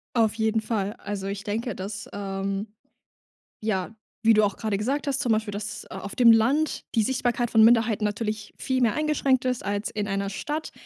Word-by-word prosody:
Auf 225 -2 +3
jeden 220 0 +1
Fall. 210 -2 -2
Also, 200 -1 -4
ich 200 0 -4
denke, 220 +1 -3
dass, 200 +2 -6
ähm 195 0 -3 0.9
ja, 210 -2 -1 0.3
wie 225 0 +6
du 215 -1 +5
auch 200 - -1
grade 215 -3 -1
gesagt 270 +8 -1
hast, 275 -1 0
zum 245 - +1
Beispiel, 215 -1 -1
dass, 210 +1 -5
äh, - - -17
auf 200 - -6
dem 240 -2 +7
Land 270 +8 +2
die 225 - +4
Sichtbarkeit 245 0 0
von 225 - +5
Minderheiten 225 -2 +4
natürlich 215 0 -3
viel 260 -1 -1
mehr 230 -3 +3
eingeschränkt 290 -4 +1
ist, 250 -1 -1
als 205 +1 -1
in 210 -1 -3
einer 195 0 -1
Stadt. 300 +10 -4
220 Hz, 195 wpm, -26 LUFS, 205-240 Hz, 0.9 s, dem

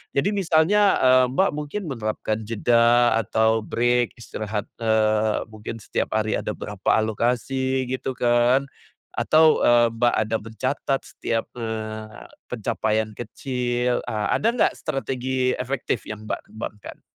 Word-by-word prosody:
Jadi 140 +8 +2
misalnya, 195 +3 +3
eee, 130 0 +6
Mbak 190 +7 +3
mungkin 150 +7 -4
menerapkan 110 -2 -3
jeda 115 +1 +3
atau 110 +2 +2
break 120 +1 +1
istirahat, 110 -2 -4 0.2
eee, 110 -1 +2
mungkin 110 +1 -7
setiap - - -2
hari 110 0 +1
ada 105 - -3
berapa 100 -2 -1
alokasi 125 +4 -1
gitu 130 0 -3
kan, 120 +3 +3 0.5
atau, 155 0 +4
eee, 120 0 +5
Mbak 120 +1 +2
ada 110 +1 -1
mencatat 130 +5 -2
setiap, 115 -1 -3
eee, 110 -2 -6 0.2
pencapaian 110 0 -1
kecil, 125 +1 -2
eee, 105 -1 -2
ada 220 - +1
nggak 245 - +2
strategi 130 -3 -1
efektif 125 -4 -3
yang 105 0 -7
Mbak - - -2
kembangkan? 110 -1 -8
120 Hz, 125 wpm, -23 LUFS, 110-130 Hz, 0.5 s, eee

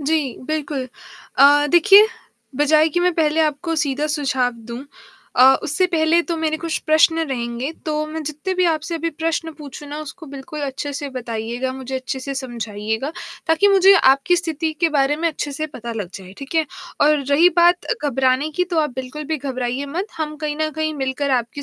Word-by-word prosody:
जी, 295 -2 0
बिल्कुल। 295 -4 -3 0.5
अ, 290 +1 +6
देखिए 390 +5 +7 0.5
बजाए 305 +2 +4
कि 350 - +2
मैं 360 0 +2
पहले 315 -1 +2
आपको 315 +2 0
सीधा 285 +1 -1
सुझाव 265 -5 0 0.2
दूँ 240 +3 -6 0.5
अ, 250 - +6 0.2
उससे 335 +3 +1
पहले 330 -1 +2
तो 335 - -1
मेरे 315 -1 -1
कुछ 330 -1 -2
प्रश्न 315 +1 +4
रहेंगे, 240 +1 -3 0.2
तो 305 0 -1
मैं 315 +1 -5
जितने 305 +5 -4
भी 365 0 +2
आपसे 315 +2 -4
अभी 330 0 -2
प्रश्न 325 0 -2
पूछूँ 295 0 -9
ना, 295 +1 -6
उसको 315 +2 -9
बिल्कुल 295 +3 -7
अच्छे 285 +1 -4
से 285 0 -4
बताइएगा, 240 +1 -4
मुझे 265 0 -7
अच्छे 260 +1 -4
से 275 +1 -5
समझाइएगा 225 0 -4 0.4
ताकि 325 +5 +4
मुझे 390 -1 +6 0.2
आपकी 275 +7 +2
स्थिति 325 -2 -2
के 335 - +4
बारे 275 +1 +2
में 330 +2 -1
अच्छे 295 -2 -4
से 310 +3 -3
पता 235 -6 -7
लग 205 -6 -5
जाए। 190 -1 -10
ठीक 275 +3 -8
है? 320 -1 +2 0.3
और 300 +1 +5
रही 315 +5 +6
बात 350 +1 +4
अ, - - -1
घबराने 265 +2 +1
की, 360 +4 0
तो 350 -2 -2
आप 300 - -1
बिल्कुल 260 +4 -6
भी - - +1
घबराइए 260 -1 -3
मत, 345 +8 -3
हम 305 -1 -3
कहीं 300 -1 -3
न 310 0 -1
कहीं 315 0 -1
मिलकर 270 0 -2
आपकी 235 +4 -6
295 Hz, 195 wpm, -20 LUFS, 265-320 Hz, 0.5 s, देखिए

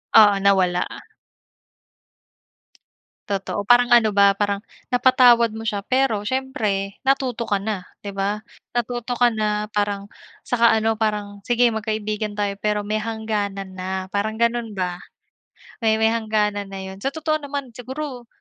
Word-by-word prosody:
Oo 210 -2 +8
nawala. 185 -3 +3 2.4
Totoo, 200 0 -3
parang 245 0 +5
ano 220 -4 +5
ba, 200 0 +6
parang 205 0 0 0.2
napatawad 245 -2 +5
mo 225 0 -6
siya 205 -2 -2
pero 255 -4 +1
siyempre 210 -6 -2
natuto 265 -3 +1
ka 200 -3 0
na, 200 -2 -3 0.2
'di 200 -1 -7
ba. 200 +2 -1 0.3
Natuto 240 0 -2
ka 245 - +6
na, 210 -2 -1
parang 205 -1 -1 0.4
saka 235 -1 +4
ano, 220 0 +2
parang 205 -2 -2
sige 240 0 +3
magkaibigan 215 -1 -3
tayo 200 -1 0
pero 210 0 -1
may 215 0 -1
hangganan 205 -4 -3
na, 185 0 -4
parang 220 +2 -1
gano'n 235 -1 +1
ba, 180 -3 -2 0.8
may 220 -2 +3
may 220 0 +3
hangganan 210 -3 0
na 195 0 -7
'yon. 190 0 -8
Sa 270 +7 -3
totoo 310 0 0
naman, 280 -3 -5
siguro 255 +1 -7
215 Hz, 140 wpm, -22 LUFS, 200-240 Hz, 2.4 s, Oo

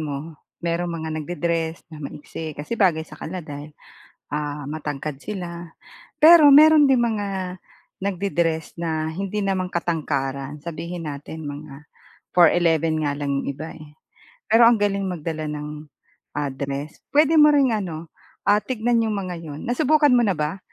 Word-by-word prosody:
mo 150 +1 -6 0.2
merong 170 +1 -1
mga 160 -1 -4
nagde-dress 165 0 -2
na 155 - -9
maiksi 150 +2 -7
kasi 145 +9 -6
bagay 180 -8 +2
sa 155 -1 -14
kanila 180 +1 -5
dahil, 145 0 -8 0.6
ah, 145 -1 -4
matangkad 150 -1 -4
sila. 170 +1 -7 0.5
Pero 310 -2 +9
meron 305 +1 +8
ding 265 -2 +4
mga 200 -5 -2 0.5
nagde-dress 170 -5 -1
na 160 -2 -1
hindi 195 +5 -3
naman 185 -2 -1
katangkaran. 145 -4 -2
Sabihin 170 0 -5
natin 145 +2 -7
mga 145 0 -9 0.5
4'11 165 -2 +4
nga 145 -1 -1
lang 140 -1 -1
'yong - - -5
iba, 155 +4 -5
eh. 155 -1 -14 0.6
Pero 230 +1 +7
ang 240 - +5
galing 200 -1 0
magdala 160 -3 -4
ng, 150 0 -6 0.5
ah, 145 -2 -1
dress. 140 +2 -5 0.2
Puwede 310 +2 +5
mo 300 - +8
ring 280 -4 +4
ano, 170 -6 -4 0.3
ah, 205 +1 +4
tignan 240 -1 0
'yong 215 - -1
mga 185 -3 -4
'yon. 155 -3 -8
Nasubukan 290 +4 +3
mo 245 - +5
na 200 -5 +1
ba 155 +5 -2
165 Hz, 150 wpm, -23 LUFS, 150-200 Hz, 0.6 s, Pero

